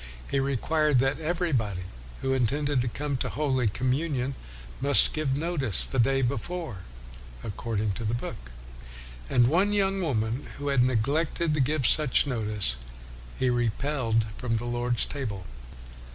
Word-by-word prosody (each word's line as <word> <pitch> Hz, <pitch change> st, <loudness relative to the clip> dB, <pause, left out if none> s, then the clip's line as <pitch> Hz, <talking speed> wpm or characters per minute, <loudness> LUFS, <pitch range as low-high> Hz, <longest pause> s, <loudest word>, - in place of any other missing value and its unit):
He 140 Hz, -, +2 dB
required 140 Hz, +2 st, +1 dB
that 135 Hz, +4 st, +1 dB
everybody 150 Hz, -, -1 dB, 0.4 s
who 135 Hz, -, +1 dB
intended 135 Hz, +2 st, +1 dB
to 125 Hz, -, -1 dB
come 140 Hz, +3 st, -2 dB
to -, -, -2 dB
the -, -, -6 dB
Holy 130 Hz, -4 st, +1 dB
Communion 130 Hz, +4 st, -1 dB, 0.5 s
must 140 Hz, 0 st, +6 dB
give 150 Hz, -4 st, 0 dB
notice 145 Hz, -, +2 dB
the 135 Hz, -, -3 dB
day 135 Hz, +3 st, +3 dB
before, 125 Hz, -, -3 dB, 0.7 s
according 110 Hz, 0 st, -2 dB
to 100 Hz, -, -5 dB
the 110 Hz, +2 st, 0 dB
book. 60 Hz, -, -6 dB, 0.8 s
And 120 Hz, -, +4 dB
one 180 Hz, +10 st, +3 dB
young 195 Hz, -1 st, +1 dB
woman 120 Hz, -5 st, -1 dB
who 145 Hz, 0 st, -3 dB
had 140 Hz, -3 st, +3 dB
neglected 145 Hz, +7 st, +1 dB
to 150 Hz, -, 0 dB
give 140 Hz, 0 st, +1 dB
such 150 Hz, 0 st, +4 dB
notice 105 Hz, -, -1 dB, 0.6 s
he 130 Hz, -1 st, +2 dB
repelled 120 Hz, -1 st, 0 dB
from 115 Hz, -3 st, -1 dB
the 120 Hz, -, -4 dB
Lord's 120 Hz, 0 st, 0 dB
Table. 105 Hz, -10 st, -5 dB
130 Hz, 145 wpm, -27 LUFS, 115-150 Hz, 0.8 s, must